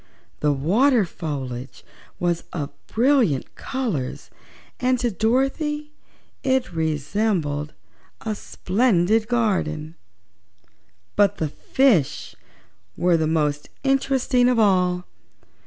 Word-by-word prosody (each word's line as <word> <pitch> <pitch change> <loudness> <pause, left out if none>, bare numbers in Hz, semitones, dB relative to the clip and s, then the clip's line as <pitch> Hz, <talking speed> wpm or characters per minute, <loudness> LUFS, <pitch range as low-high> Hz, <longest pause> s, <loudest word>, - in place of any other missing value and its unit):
The 150 - +2
water 210 - +3
foliage 135 -6 -6 0.3
was 175 -1 0
of 145 -4 -3 0.2
brilliant 235 - +2
colors 215 - -4 0.5
and 255 0 +2
to 240 -1 0
Dorothy 270 - 0 0.5
it 260 -7 0
resembled 155 -1 -1 0.5
a 220 - -2
splendid 215 0 +1
garden. 185 -10 0 1.2
But 205 -1 +3
the 155 - -1
fishes 215 - +1 0.6
were 175 -1 +3
the 160 -1 +1
most 150 -2 0
interesting 265 -2 +2
of 250 - +2
all. 180 -4 +3
195 Hz, 90 wpm, -23 LUFS, 155-250 Hz, 1.2 s, water